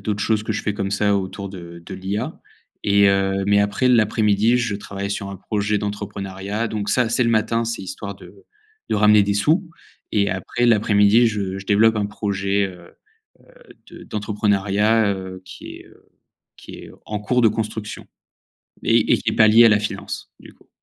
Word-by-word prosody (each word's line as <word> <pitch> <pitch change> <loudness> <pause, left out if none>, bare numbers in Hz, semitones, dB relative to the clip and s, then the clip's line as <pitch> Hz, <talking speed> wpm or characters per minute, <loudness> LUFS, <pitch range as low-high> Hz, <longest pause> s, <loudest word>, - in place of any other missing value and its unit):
d'autres 100 -1 -2
choses 110 -1 +1
que 110 - -3
je 105 - -4
fais 105 - -2
comme 100 -1 -3
ça 100 0 +1
autour 100 +1 -5
de 85 -3 -10
de - - -8
l'IA 95 +3 -4 0.4
et 100 0 +4
heu, 95 0 +1
mais 100 0 +4
après, 100 +5 +1
l'après-midi 110 -1 +3
je 115 -4 -1
travaille 100 -1 -6
sur 100 -1 -4
un 100 - -7
projet 105 +1 -2
d'entrepreneuriat. 100 +1 -4
Donc 105 -1 -4
ça, 125 +1 +2
c'est 125 0 +2
le 115 - +1
matin, 115 +1 +1
c'est 115 -4 -3
histoire 100 +2 -7
de - - -14 0.6
de - - 0
ramener 105 0 +5
des 100 0 0
sous 160 - +1 0.4
et 100 -1 +1
après 95 +5 -2
l'après-midi, 105 0 +4
je 100 -3 -2
je 95 - -10
développe 110 +2 +4
un 105 - 0
projet, 100 -1 -1
heu 90 -2 -14 0.5
heu, - - -24 0.4
de - - -12
d'entrepreneuriat, 105 0 +1
heu, 95 -1 -8
qui 90 - -10
est, - - -16
heu, - - -22 0.5
qui - - -13
est - - -12 0.2
en 105 - -3
cours 125 +5 0
de 115 - +6
construction 110 0 -5 0.8
et - - +3
et - - +4
qui - - -1
est - - -5
pas 110 -1 +6
lié 115 +2 +7
à - - +8
la 110 -1 +3
finance, 105 - -6
du - - -14
coup. - - -27
105 Hz, 195 wpm, -21 LUFS, 100-110 Hz, 0.8 s, à